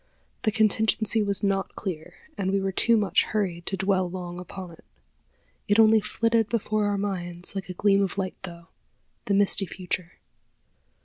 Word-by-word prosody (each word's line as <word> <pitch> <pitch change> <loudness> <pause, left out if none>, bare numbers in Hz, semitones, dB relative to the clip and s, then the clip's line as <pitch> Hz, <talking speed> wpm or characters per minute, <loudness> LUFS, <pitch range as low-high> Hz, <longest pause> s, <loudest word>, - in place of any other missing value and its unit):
The 215 - +1
contingency 220 0 +2
was 200 -1 +2
not 195 -1 0
clear, 170 -6 -5 0.2
and 190 -1 -2
we 195 +1 +1
were 195 0 -1
too 230 +4 +3
much 200 -3 +3
hurried 180 -5 -2
to 195 - -1
dwell 190 -2 +1
long 175 -1 -6
upon 180 0 -8
it. 165 - -16 0.8
It 205 0 +3
only 220 0 +6
flitted 230 0 +1
before 215 -2 0
our 205 0 0
minds 180 -3 -3
like 195 -1 -5
a 180 - -5
gleam 200 +1 +3
of 195 0 -2
light 190 -1 -2
through, 170 -3 -9 0.6
the 200 - +1
misty 200 -1 +2
future. 180 -1 -4
195 Hz, 170 wpm, -26 LUFS, 180-210 Hz, 0.8 s, only